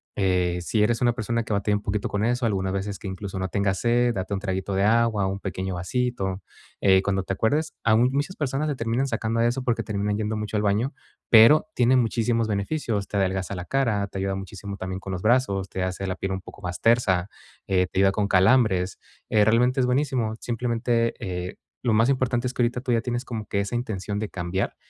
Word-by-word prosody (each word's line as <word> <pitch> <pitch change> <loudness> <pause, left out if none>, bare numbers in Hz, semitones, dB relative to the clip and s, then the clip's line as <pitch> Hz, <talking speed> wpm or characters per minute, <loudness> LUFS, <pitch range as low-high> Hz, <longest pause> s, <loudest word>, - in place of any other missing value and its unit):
eh, 90 -3 +1
si 105 +5 0
eres 115 +1 +1
una 120 -1 +3
persona 115 0 -2
que 110 - -3
batalla 105 +1 +1
un 105 - -10
poquito 100 0 -2
con 100 +1 -1
eso, 120 +1 0
algunas 95 -3 0
veces 100 0 -3
que 100 - -7
incluso 95 0 -6
no 95 - -1
tengas 100 -1 0
sed, 120 0 +2
date 95 0 -3
un 95 - -1
traguito 95 0 -2
de 95 +1 +1
agua 110 -2 +3
o - - -1
un 100 - -4
pequeño 95 -1 -4
vasito, 95 0 -2 0.4
eh, 95 -1 +5
cuando 95 -1 0
te 95 - -3
acuerdes. 150 +10 0
Aun 115 +3 +4
muchas 145 +7 -2
personas 145 +1 -1
le 145 - -1
terminan 120 +3 -1
sacando 115 -1 -1
a 115 - +3
eso 125 +2 -1
porque 120 -3 0
terminan 105 -1 -1
yendo 110 0 -2
mucho 105 0 -3
al 105 - 0
baño, 105 +6 +1 0.4
pero 115 +8 +7
tiene 125 +1 +4
muchísimos 115 -1 +1
beneficios. 105 -1 -2
Te - - -7
adelgaza 95 0 -1
la 90 -1 -6
cara, 110 -7 0
te 95 - -8
ayuda 95 0 -1
muchísimo 95 +1 -7
también 95 0 -4
con 95 -1 -6
los 90 - -4
brazos, 110 -5 +1
te 95 - -3
hace 95 +1 -3
la 95 - -2
piel 95 +1 -4
un 95 - -4
poco 105 - -13
más 90 -1 -5
tersa, 105 -6 +3 0.4
eh, 90 -1 +2
te 95 - -3
ayuda 95 0 +5
con 100 0 0
calambres, 95 -1 +3 0.3
eh, 105 -1 +4
realmente, 125 +4 +3
es 125 - +3
buenísimo, 125 -4 0
simplemente, 115 0 0
eh, 90 -4 -4 0.3
lo 120 -3 +1
más 115 +4 +4
importante 125 -2 +1
es 125 - -4
que 125 - -1
ahorita 120 +1 0
tú 130 -1 -2
ya 115 - +3
tienes 120 +1 -3
como 110 -4 -5
que 100 - 0
esa 100 +3 -5
intención 105 -4 -3
de 110 - -2
cambiar 95 0 -3
105 Hz, 225 wpm, -25 LUFS, 95-120 Hz, 0.4 s, pero